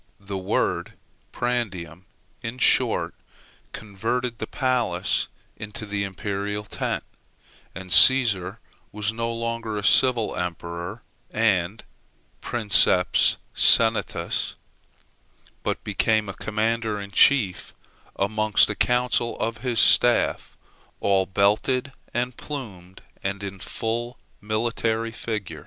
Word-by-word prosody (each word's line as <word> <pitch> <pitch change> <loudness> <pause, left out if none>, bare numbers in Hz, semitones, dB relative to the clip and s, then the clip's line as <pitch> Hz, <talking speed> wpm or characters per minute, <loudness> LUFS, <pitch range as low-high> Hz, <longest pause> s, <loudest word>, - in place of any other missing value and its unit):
The 100 0 -7
word 95 0 -1 0.4
prandium, 95 -8 -3 0.4
in 115 +2 -5
short, 125 - +2 0.6
converted 115 +4 -3
the 110 - -4
palace 120 -9 0 0.3
into 105 0 -7
the 100 -1 -2
imperial 100 +1 -4
tent; 105 - -3 0.7
and 95 0 -8
Cæsar 115 -7 +5 0.3
was 105 +1 -2
no 115 0 -2
longer 115 -1 -3
a 105 - -4
civil 120 0 +3
emperor 85 +4 -5 0.3
and 105 -2 0 0.6
princeps 105 -5 +3 0.2
senatûs, 115 -1 +2 1.1
but - - -3
became 110 -2 +1
a - - -4
commander 110 0 -1
in 100 0 -8
chief 100 -2 +3 0.4
amongst 110 +1 +2
a - - -4
council 125 0 +1
of 115 -1 -2
his 120 -1 -1
staff, 120 +3 +4 0.4
all 95 -1 +2
belted 105 +8 +1 0.2
and 125 0 -2
plumed, 95 -11 -8 0.2
and 100 0 -3
in 100 -1 -6
full 120 +5 -3 0.2
military 115 +1 -1
fig. 105 -7 -5
110 Hz, 105 wpm, -24 LUFS, 100-115 Hz, 1.1 s, Cæsar